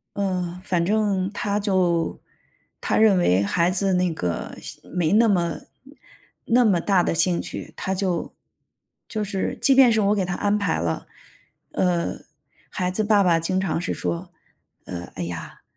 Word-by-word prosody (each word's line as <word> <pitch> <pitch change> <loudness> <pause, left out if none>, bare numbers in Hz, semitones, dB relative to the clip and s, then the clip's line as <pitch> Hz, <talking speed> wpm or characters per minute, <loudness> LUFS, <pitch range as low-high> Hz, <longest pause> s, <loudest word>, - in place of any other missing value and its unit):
嗯， 180 -3 -2
反 175 -2 0
正 200 -2 +1
他 205 0 -1
就 185 -5 0 0.6
他 - - 0
认 215 -4 +5
为 95 - +3
孩 170 - +1
子 195 +1 +1
那 180 -2 +1
个 90 - -4
兴 - - -8
没 170 -3 +1
那 225 +2 +5
么 175 -5 +1 0.9
那 245 +2 +4
么 195 -5 +3
大 190 +1 +2
的 - - 0
兴 170 +1 +2
趣， - - -7
他 190 - -2
就 185 -3 -2 0.7
就 215 -3 -3
是 195 -2 -3
即 275 - +4
便 265 -2 +7
是 220 -1 +2
我 205 +1 +2
给 200 - 0
他 180 -1 -3
安 205 0 +1
排 200 -5 0
了， 80 -1 -3 0.6
呃， 175 -2 0 0.5
孩 180 -1 -2
子 215 +4 0
爸 210 -1 +4
爸 170 -3 +3
经 185 +3 0
常 175 -3 -1
是 180 - -2
说， 85 -1 -4 0.5
呃， 85 -1 -7
“哎 90 - -4
呀。 85 -1 -7
呃 - - -36
185 Hz, 185 characters per minute, -23 LUFS, 170-205 Hz, 0.9 s, 便